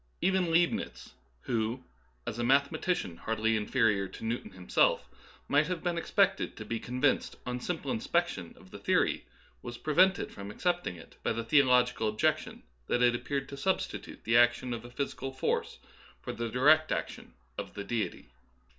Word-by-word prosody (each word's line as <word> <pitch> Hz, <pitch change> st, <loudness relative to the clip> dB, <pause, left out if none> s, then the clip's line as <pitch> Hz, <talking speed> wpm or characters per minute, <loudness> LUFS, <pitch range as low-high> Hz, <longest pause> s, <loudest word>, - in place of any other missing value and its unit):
Even 185 Hz, -1 st, +2 dB
Leibnitz, 170 Hz, +1 st, 0 dB, 0.3 s
who, 115 Hz, +2 st, -1 dB, 0.4 s
as 110 Hz, -, -4 dB
a -, -, 0 dB
mathematician 140 Hz, -, +1 dB
hardly 110 Hz, +3 st, 0 dB
inferior 105 Hz, -3 st, +2 dB
to 110 Hz, -, -9 dB
Newton 115 Hz, +2 st, -2 dB
himself, 95 Hz, -1 st, +2 dB, 0.4 s
might 150 Hz, +2 st, +3 dB
have 180 Hz, -2 st, -3 dB
been 175 Hz, -1 st, 0 dB
expected 195 Hz, +3 st, +1 dB
to 110 Hz, -, -7 dB
be 115 Hz, +1 st, -3 dB
convinced 125 Hz, +4 st, 0 dB
on 125 Hz, 0 st, -3 dB
simple 150 Hz, -1 st, -3 dB
inspection 110 Hz, -, -1 dB
of -, -, -17 dB
the -, -, -9 dB
theory, -, -, +1 dB, 0.4 s
was 120 Hz, -, -7 dB
prevented 180 Hz, +7 st, +3 dB
from 100 Hz, 0 st, -8 dB
accepting 175 Hz, -, -1 dB
it 85 Hz, -, -14 dB
by -, -, 0 dB
the 115 Hz, +1 st, -2 dB
theo 140 Hz, +4 st, +5 dB
logical 125 Hz, -3 st, +3 dB
objection 105 Hz, 0 st, 0 dB, 0.2 s
that 120 Hz, -, +2 dB
it 120 Hz, -1 st, +5 dB
appeared 140 Hz, +3 st, -2 dB
to 140 Hz, -, -7 dB
substitute 190 Hz, +7 st, -2 dB
the 115 Hz, -, +1 dB
action 120 Hz, +1 st, +4 dB
of 115 Hz, -1 st, -5 dB
a 120 Hz, -, -10 dB
physical 135 Hz, +1 st, -4 dB
force 130 Hz, -, -1 dB, 0.4 s
for -, -, -6 dB
the 115 Hz, -1 st, -3 dB
direct 155 Hz, +6 st, +4 dB
ac -, -, +1 dB
tion -, -, -14 dB, 0.2 s
of -, -, -6 dB
the 100 Hz, -, -4 dB
Deity. 115 Hz, 0 st, -3 dB
125 Hz, 170 wpm, -30 LUFS, 115-155 Hz, 0.4 s, theo